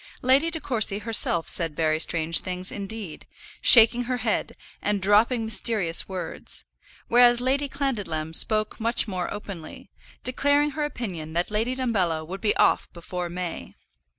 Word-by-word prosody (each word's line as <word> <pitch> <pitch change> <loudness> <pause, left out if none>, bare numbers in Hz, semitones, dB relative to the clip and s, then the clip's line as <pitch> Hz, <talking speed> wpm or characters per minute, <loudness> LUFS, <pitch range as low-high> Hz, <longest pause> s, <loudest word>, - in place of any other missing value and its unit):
Lady 270 +6 +3
De 325 -1 -3
Courcy 220 -8 0
herself 210 -6 +2
said 165 -4 +1
very 155 -1 0
strange 165 0 +3
things 185 0 -3
indeed, 200 -4 -7 0.3
shaking 240 +1 +7
her 250 +1 -2
head, 225 -2 -2 0.3
and 205 -1 -1
dropping 220 +4 +2
mysterious 210 -6 +1
words; 185 -2 -4 0.4
whereas 240 0 +5
Lady 275 +3 -1
Clandidlem 205 - -4
spoke 215 +6 0
much 230 +1 +1
more 185 -3 -4
openly, 195 -6 -9 0.3
declaring 285 +3 +1
her 300 0 -3
opinion 180 - -6
that 175 +4 -2
Lady 225 +4 -1
Dumbello 190 -11 -1
would 190 +4 -8
be 210 - 0
off - - +1
before 175 +1 -6
May. 175 -1 -7
210 Hz, 145 wpm, -24 LUFS, 175-245 Hz, 0.4 s, shaking